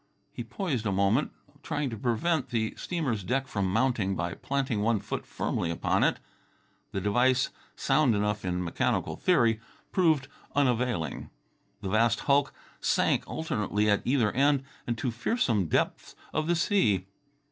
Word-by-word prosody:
He 120 - -6
poised 125 - -2
a - - +1
moment, 100 +8 +2 0.3
trying 145 -3 -2
to - - -4
prevent 130 +7 0
the 110 -2 -1
steamer's 135 - -2
deck 130 +7 0
from 100 -6 -1
mounting 110 -3 +1
by 85 0 -2
planting 135 -6 -1
one 110 0 +2
foot - - -5
firmly 85 - -2
upon 85 - +1
it. - - +2 0.7
The 95 - -2
device, 125 +6 +2 0.2
sound 135 -8 +3
enough 105 0 0
in 90 0 -1
mechanical 85 - 0
theory, 120 -11 +3 0.3
proved 160 -7 +3 0.3
unavailing. 125 - 0 0.5
The 95 - -3
vast 115 +3 +2
hulk 140 0 +3 0.3
sank - - +1
alternately 105 -8 0
at 105 - +2
either 125 -5 +2
end, 140 +1 +3 0.2
and 120 -1 -1
to 125 - -1
fearsome 115 - 0
depths - - -1 0.2
of 155 +1 0
the 175 - +3
sea. 115 - +2
120 Hz, 145 wpm, -28 LUFS, 105-140 Hz, 0.7 s, sound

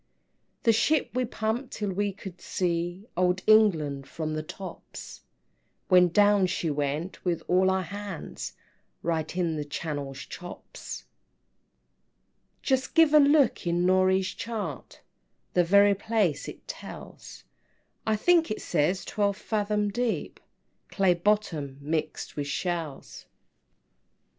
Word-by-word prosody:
"The 230 - +5
ship 280 +7 +2
we 255 +1 +1
pumped 230 +3 -3
till 205 -2 -2
we 200 +2 0
could 190 -2 -10
see 175 +2 -2
Old 180 +1 +1
England 160 -11 +4
from 155 -1 -4
the 155 - -2
tops; 180 +3 -9 0.7
When 180 -1 +7
down 205 +1 +4
she 170 -3 -1
went 145 +5 -3
with 175 -3 -1
all 185 +1 +4
our 190 0 +1
hands, 200 0 -6 0.5
Right 165 0 -2
in 170 -3 0
the 150 - -2
Channel's 145 -2 -4
Chops." 175 0 -8
VII. - - -31 1.6
"Just 265 +1 0
give 325 -2 +6
a 305 - +9
look 280 - +4
in 175 +1 +1
Norey's 185 0 +3
chart, 225 -1 -6 0.5
The 180 - +4
very 200 +3 +6
place 205 -6 0
it - - -10
tells; - - -9 0.6
I 220 - +1
think 335 +9 +3
it 215 - -2
says 175 +4 0
twelve 200 -2 0
fathom 210 -1 -1
deep, 240 0 -2 0.5
Clay 190 -2 +3
bottom, 170 -7 0
mixed 155 +2 -3
with 145 -1 -3
shells." 165 -3 -4
185 Hz, 125 wpm, -27 LUFS, 170-210 Hz, 1.6 s, a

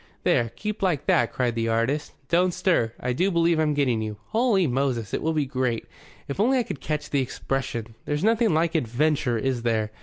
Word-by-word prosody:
"There, 115 -1 +2
keep 210 0 -4
like 180 -8 0
that," 120 - +3
cried 125 -2 0
the 115 0 -1
artist. 115 +6 0
"Don't 175 +2 +2
stir. 180 - +2
I 125 0 -1
do 180 +10 +1
believe 170 -2 +2
I'm 150 -2 +2
getting 125 -6 +1
you. 105 -1 -4
Holy 220 -5 +2
Moses, 125 -6 -1
it - - -1
will 160 - 0
be 150 -2 +1
great! 130 -4 -1 0.4
If 140 - -5
only 255 +6 +3
I 250 - +2
could 150 - -7
catch 150 -1 -3
the 140 - +2
expression! 125 -3 -3
There's 150 +3 -1
nothing 225 0 +3
like 160 +1 +1
adventure, 135 -2 +1
is 130 +1 -1
there? 110 -2 0
140 Hz, 205 wpm, -25 LUFS, 120-170 Hz, 0.4 s, that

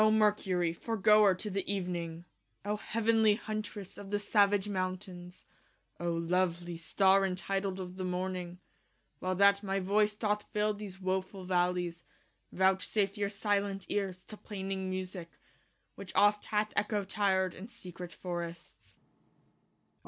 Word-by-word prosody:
0 215 - +6
Mercurie, 205 -5 +2
foregoer 210 0 +4
to 210 +3 -5
the 195 +1 0
event 180 -3 -1
ng 170 0 -5 0.4
y - - -4
0 210 - +1
heavenlie 220 0 +3
huntresse 215 -3 -5
of 200 -1 -9
the 205 - +1
savage 205 -1 +3
mountaines 185 -2 -4 0.5
y 175 - -4
0 170 - +1
lovelie 175 0 0
starre 195 +3 +4
y 195 - +2
entitled 195 +1 -2
of 180 0 -6
the 185 - -3
morntng 180 0 -2
y - - -15 0.6
While 185 0 -1
that 200 +1 +5
my 195 -1 -1
voice 210 +2 +2
doth 210 -1 0
fill 210 0 +2
these 200 -2 -8
wo 190 0 +1
full 185 0 -11
v 185 - -3
allies 175 -1 +1 0.5
y - - -12
Vouchsafe 190 +2 +2
your 205 -1 -1
silent 200 -1 -1
eares 190 -3 -2
to 215 - -11
plaining 190 -2 -4
musique 185 -3 -5
y - - -30 0.6
Which 200 -2 -9
oft 205 0 +4
hath 210 0 0
Echo 210 -1 +1
tir'd 190 -2 +1
in 195 - -9
secrete 180 -7 -9
forrests. 170 - -7
190 Hz, 160 wpm, -32 LUFS, 180-205 Hz, 0.6 s, 0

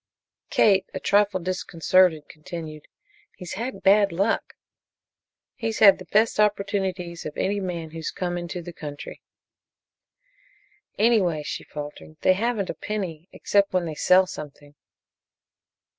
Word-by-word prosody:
Kate, 195 -3 +4
a - - -2
trifle 200 -1 +2
disconcerted, 180 -2 +1
continued: 155 -2 -9 0.5
"He's 180 -3 -7
had 235 +6 -5
bad 200 0 +5
luck." 195 +6 -1 1.0
"He's 225 -4 -3
had 200 -3 +7
the 185 - -10
best 215 +4 +2
opportunities 195 -4 0
of 150 - -7
any 200 +1 0
man 170 -4 -5
who's 160 0 -5
come 175 -1 -3
into 175 0 -5
the 175 0 -9
country." 145 -3 -8 1.8
"Anyway," 195 -9 +2
she - - -5
faltered, 150 +1 -9
"they 185 - +5
haven't 210 -1 -1
a - - -6
penny 185 -6 -5
except 200 -1 +1
when 180 -2 +1
they 160 - -4
sell 185 +5 +4
something." 145 -4 -10
185 Hz, 130 wpm, -24 LUFS, 165-200 Hz, 1.8 s, had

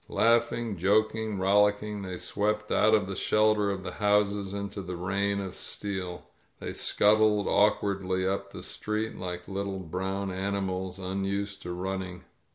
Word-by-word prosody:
•. - - -36
/' - - -35
Laughing, 115 -2 +2
joking, 110 +3 +1
rollicking, 105 +2 +2
they 95 -2 -5
swept 105 +2 -1
out 110 +1 +5
of 105 -2 +2
the 95 0 -5
shelter 105 0 +3
of 95 -1 -3
the - - -4
houses 105 -1 +1
into 100 0 -4
the 90 -1 -5
rain 100 +3 0
of 95 -2 -4
steel. 95 -3 -4 0.4
They - - -5
scut 105 +1 +3
tled 105 -2 +3
awkwardly 100 -3 +2
up 100 +1 -2
the - - -8
street, 110 +1 -3
like 90 -1 -5
little 100 0 -3
brown 95 +2 -3
animals 95 -1 -2
unused 100 +1 -3
to 90 - -5
running. 95 0 -4
100 Hz, 160 wpm, -28 LUFS, 95-105 Hz, 0.4 s, out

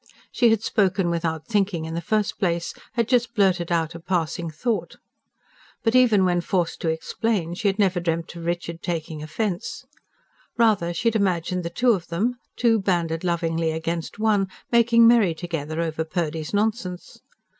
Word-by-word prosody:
She 240 - +4
had 225 -1 +2
spoken 190 -5 +1
without 165 -2 -2
thinking 195 -7 0
in 160 - -5
the 170 - -2
first 215 +2 -1
place 170 -3 -1 0.2
had 235 -2 0
just 245 -2 +1
blurted 185 -4 +2
out 165 -1 0
a 170 - -8
passing 170 -1 -2
thought. 215 +9 -2 0.9
But 225 -1 +2
even 230 -7 +5
when 175 -1 +2
forced 175 -2 -1
to 165 - 0
explain, 175 +2 -1
she 200 +4 -1
had 195 0 +1
never 195 -3 +2
dreamt 170 0 -2
of 170 - -7
Richard 170 -1 -3
taking 160 -3 -4
offence. 185 +8 -3 0.7
Rather 215 -7 +3
she 200 +7 +1
had 225 - -6
imagined 180 -3 0
the 170 - -3
two 245 +8 +2
of 180 -6 -1
them 230 +9 -1 0.2
two 230 -2 +3
banded 170 -4 0
lovingly 165 -2 0
against 165 +2 -3
one 210 -3 +2 0.2
making 235 0 +5
merry 225 -8 +5
together 160 -2 -4
over 160 -1 -1
Purdy's 160 -2 -3
nonsense. 205 -4 -2
175 Hz, 165 wpm, -24 LUFS, 165-215 Hz, 0.9 s, even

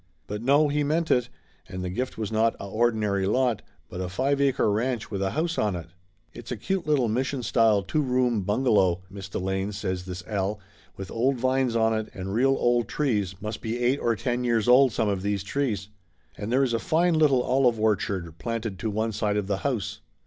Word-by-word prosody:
But 105 +1 -5
no, 140 +5 +4
he 145 +1 0
meant 160 +3 0
it, 125 -1 +2 0.4
and 90 0 -5
the 90 - -3
gift 125 +7 -3
was 110 -2 -3
not 110 +1 +2
a - - -8
ordinary 105 -2 +1
lot, 125 +1 +1 0.3
but 90 - -6
a 90 - -3
five 135 +9 0
acre 135 -6 +2
ranch 115 +2 -1
with 100 -2 -3
a 95 - +1
house 165 - -1
on 105 -3 +1
it. 85 -2 -7 0.4
"It's 120 +1 -10
a 125 - -2
cute 185 - -2
little 140 -5 +3
Mission 130 +3 -1
style 110 -4 +3
two 155 +10 0
room 125 -4 +1
bungalow, 95 -4 +2
226 100 0 -8
Laughter 95 - -5
Limited 95 +1 -1
Miss 100 0 -6
Delane," 95 -3 -1
says 90 - -10
this 90 -1 -7
Al, 105 0 -2 0.4
"with 95 -1 -7
old 130 +4 +1
vines 130 -1 +1
on 110 -1 +3
it, 110 -1 -2
and 95 0 -5
real 135 +4 +3
old 120 -2 +2
trees 105 -10 -1
must 110 0 -4
be 115 +1 -3
eight 125 +3 +1
or 115 -1 +1
ten 120 +2 -2
years 115 -2 +1
old, 130 +1 +6
some 110 - 0
of 100 -2 -1
those 100 -1 -1
trees. 105 -4 -2 0.5
And 105 +2 -5
there 135 +2 +3
is 125 -3 0
a 115 - +1
fine 170 +6 +2
little 145 -5 +4
olive 125 -3 +2
orchard 95 -6 -1
planted 115 -4 -4
to 115 - -2
the 105 - -3
one 110 +1 0
side 105 -1 -1
of 105 - -1
the 100 0 -1
house!" 120 -3 -3
115 Hz, 225 wpm, -26 LUFS, 100-130 Hz, 0.5 s, old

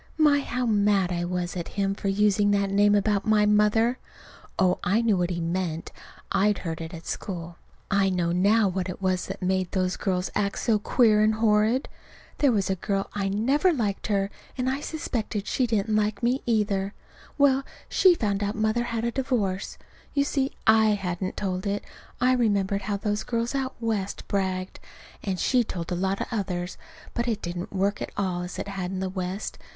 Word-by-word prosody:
My, 300 -2 +5
how 250 -2 -2
mad 205 -4 +2
I 175 0 -1
was 180 0 -3
at 170 -2 -4
him 195 -1 +1
for 200 - -5
using 205 +1 +3
that 200 -1 +1
name 205 +1 +4
about 205 0 +2
my 215 -1 +4
mother! 210 +4 +3 0.6
Oh, 185 -1 +3
I 195 +5 +2
knew 220 -3 +3
what 175 -1 0
he 175 -1 -2
meant. 170 -1 -2 0.4
I'd 205 0 +3
heard 165 0 -3
it 160 0 -6
at 165 -1 -9
school. 170 -3 -5 0.3
(I 195 -1 +3
know 175 -2 0
now 200 +5 +4
what 185 0 -2
it 180 - -6
was 185 -1 0
that 195 0 -6
made 185 -1 +1
those 185 -2 0
girls 185 -2 -1
act 200 -1 0
so 220 -3 +2
queer 215 -1 +4
and 215 0 +3
horrid.) 220 +3 +2 0.5
There 285 -3 +4
was 200 -4 +1
a 190 - 0
girl 195 +2 -2
I 195 -1 -1
never 265 - +2
liked 215 - -1
her, 200 -1 0 0.3
and 250 0 -1
I 265 +2 0
suspect 295 -9 -3
she 255 +2 0
didn't 215 -1 0
like 210 +1 0
me, 250 +3 +2
either. 200 -3 0 0.4
Well, 275 -2 +4 0.3
she 370 -2 +5
found 205 -8 -1
out 205 +1 -1
Mother 220 +2 +1
had 230 -1 -2
a 235 - 0
divorce. 230 -8 -1 0.4
(You 280 - +4
see, 275 -1 0
I 220 -1 +5
hadn't 185 -1 -3
told 185 0 -2
it. 200 +1 -1 0.4
I 255 +1 +4
remembered 200 -5 +1
how 200 +1 -2
those 210 +1 -1
girls 235 +1 -2
out 270 -1 -2
West 215 -4 -2
bragged.) 190 -2 -2 0.4
And 190 -3 -2
she 250 -2 +3
told 175 -5 -5
a - - +1
lot 190 +2 -1
of - - -2
the - - -2
others. 180 -3 -3 0.3
But 235 +1 -1
it 220 -3 -1
didn't 175 +1 -4
work 200 +2 0
at - - -3
all 185 -3 -1
as 180 0 -6
it - - -4
had 190 -2 -4
in 190 0 -4
the 190 - -1
West. 185 +1 -4
200 Hz, 200 wpm, -26 LUFS, 185-225 Hz, 0.6 s, My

